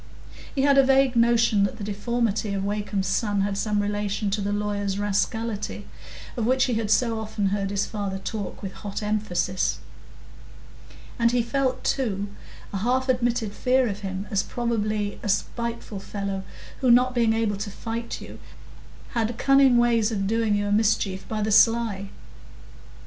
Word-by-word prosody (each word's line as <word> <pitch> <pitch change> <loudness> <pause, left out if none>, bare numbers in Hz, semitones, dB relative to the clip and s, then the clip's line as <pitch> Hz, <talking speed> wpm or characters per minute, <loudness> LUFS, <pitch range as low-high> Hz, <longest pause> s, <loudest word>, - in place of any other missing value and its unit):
He 270 - +1
had 280 -1 +5
a - - +7
vague 270 -1 +3
notion 230 -3 +4
that 200 +3 -1
the 215 - -7
deformity 210 0 -1
of 195 0 -2
Wakem's 205 -1 -2
son 205 +1 0
had 200 0 0
some 210 +1 0
relation 205 0 -1
to 205 +1 0
the 200 +1 -1
lawyer's 205 -1 -1
rascality, 205 +2 -2 0.5
of 235 - -2
which 260 +1 +3
he 250 - +1
had 220 -2 -1
so 230 0 +2
often 215 -2 -1
heard 195 0 -1
his 200 0 0
father 200 -3 -4
talk 205 +2 -5
with 195 - -4
hot 200 +1 -6
emphasis; 195 - 0 1.4
and 235 0 +4
he 245 -1 +2
felt, 260 +1 -1
too, 205 -7 -1 0.4
a - - -1
half 255 +6 0
admitted 240 -3 +1
fear 255 +2 +2
of 205 -2 -4
him 195 -1 -4
as 200 -2 +2
probably 215 -3 -2
a 210 - -4
spiteful 235 0 -2
fellow, 195 -1 -4 0.4
who, 255 - +2
not 250 +1 +5
being 230 -2 +3
able 225 -3 0
to 205 +1 -4
fight 230 +3 -5
you, - - -10 0.7
had 230 -1 -1
cunning 275 -2 +5
ways 235 -2 +3
of 195 -3 -1
doing 220 0 +1
you 205 0 0
a 205 - -1
mischief 205 -3 +1
by 215 -1 -2
the 215 - 0
sly. 215 -3 +3
215 Hz, 165 wpm, -25 LUFS, 200-235 Hz, 1.4 s, a